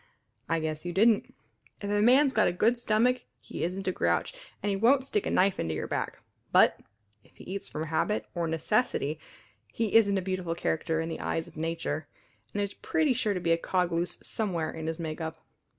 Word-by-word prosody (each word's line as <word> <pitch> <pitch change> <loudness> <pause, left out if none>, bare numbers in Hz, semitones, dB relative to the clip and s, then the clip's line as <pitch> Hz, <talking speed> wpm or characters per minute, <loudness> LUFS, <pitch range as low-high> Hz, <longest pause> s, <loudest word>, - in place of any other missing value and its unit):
I 165 0 +2
guess 155 -1 -3
you 175 0 -4
didn't. 220 +3 +3 0.5
If 200 - -5
a 205 0 +2
man's 260 +5 +5
got 215 - +4
a - - +2
good 230 +7 +2
stomach 240 +2 +2 0.2
he - - -6
isn't 185 +3 -3
a - - +3
grouch, 85 - 0 0.3
and 205 - +1
he - - +1
won't 255 +6 +4
stick 410 +9 -1
a - - 0
knife 190 +1 +2
into 80 -1 -1
your - - -3
back; - - -3 0.3
but - - +5 0.4
if - - -26
he - - -13
eats 195 +1 -5
from 155 - -4
habit 155 -9 0
or 170 -1 -1
necessity 160 - 0 0.5
he 225 - -2
isn't 200 -3 +5
a - - 0
beautiful 185 -3 -2
character 160 -1 -1
in 165 - -3
the 165 - -4
eyes 165 - -2
of - - -15
nature, 160 -1 -3 0.4
and 205 - -3
there's 200 0 -1
pretty 315 -5 +1
sure 220 -4 0
to - - -1
be 170 -1 0
a 165 - +3
cog 180 0 0
loose 170 +1 -1
somewhere 175 -8 -2
in 160 -1 -6
his 160 0 -3
makeup. 160 0 -5
180 Hz, 210 wpm, -29 LUFS, 160-215 Hz, 0.5 s, man's